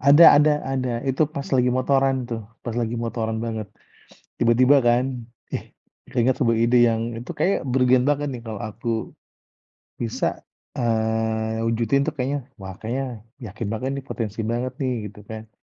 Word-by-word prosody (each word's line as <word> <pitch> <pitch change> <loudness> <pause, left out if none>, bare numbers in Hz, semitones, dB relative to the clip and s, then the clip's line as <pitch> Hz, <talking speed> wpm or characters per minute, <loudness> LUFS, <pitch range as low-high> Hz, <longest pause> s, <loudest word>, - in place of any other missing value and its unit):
Ada 145 +5 +8 0.2
ada 150 0 +5
ada, 130 -2 -1 0.2
itu 135 +4 +2
pas 140 - -3
lagi 125 0 +3
motoran 135 +1 +2 0.2
tuh, 115 -1 -2 0.2
pas 120 - -3
lagi 115 0 -2
motoran 115 -1 -2
banget. 110 -3 -4 0.7
Tiba-tiba 125 +4 +5
kan, 120 +2 +4 0.5
"Ih - - -3 0.5
keinget 125 +1 +2
sebuah 115 -1 +3
ide 120 +1 +4
yang 115 0 0 0.2
itu 125 - -9
kayaknya 195 - +2
brilian 125 -1 +4
banget 145 0 +1
nih, 120 - -6
kalau 110 -3 -5
aku, 115 +2 -5 1.1
bisa, 115 - -1 0.5
eee, 110 -1 0
wujudin 115 +4 +2
tuh - - -1
kayaknya 135 +2 -1 0.2
wah 95 0 -7
kayaknya 125 +5 -2 0.4
yakin 110 +2 -5
banget 130 +4 -2
nih 135 - -7
potensi 110 -2 -4
banget 120 +2 -2
nih," 130 - 0 0.2
gitu 105 - -15
kan. 110 0 -7
120 Hz, 155 wpm, -23 LUFS, 110-130 Hz, 1.1 s, Ada